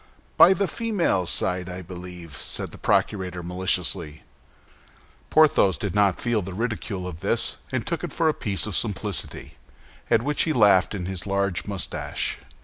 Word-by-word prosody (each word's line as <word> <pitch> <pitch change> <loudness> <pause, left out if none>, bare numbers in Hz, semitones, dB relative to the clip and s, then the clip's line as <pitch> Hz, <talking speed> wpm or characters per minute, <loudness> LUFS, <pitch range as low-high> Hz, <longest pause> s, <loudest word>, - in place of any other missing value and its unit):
"By 185 - +8
the 200 +2 0
female 180 - 0
side, 90 +1 0
I 90 +1 -6
believe?" 90 -2 -9
said - - -2
the - - -12
procurator, 90 -4 0
maliciously. 90 -4 -1 1.1
Porthos 150 - +4
did 100 - -3
not 100 -3 +3
feel 120 -3 0
the 90 0 -7
ridicule 105 -4 -3
of 85 -3 -7
this, - - +1
and - - -2
took - - -3
it - - -4
for 165 - +1
a 155 - +3
piece 100 -8 -2
of 105 -4 -2
simplicity, 105 -2 -2 0.5
at 115 - +3
which 150 +2 0
he 160 - +1
laughed 105 -5 +4
in 90 -3 -4
his 95 +1 -5
large 100 -1 -1
mustache. 100 -3 -3
95 Hz, 160 wpm, -24 LUFS, 90-115 Hz, 1.1 s, By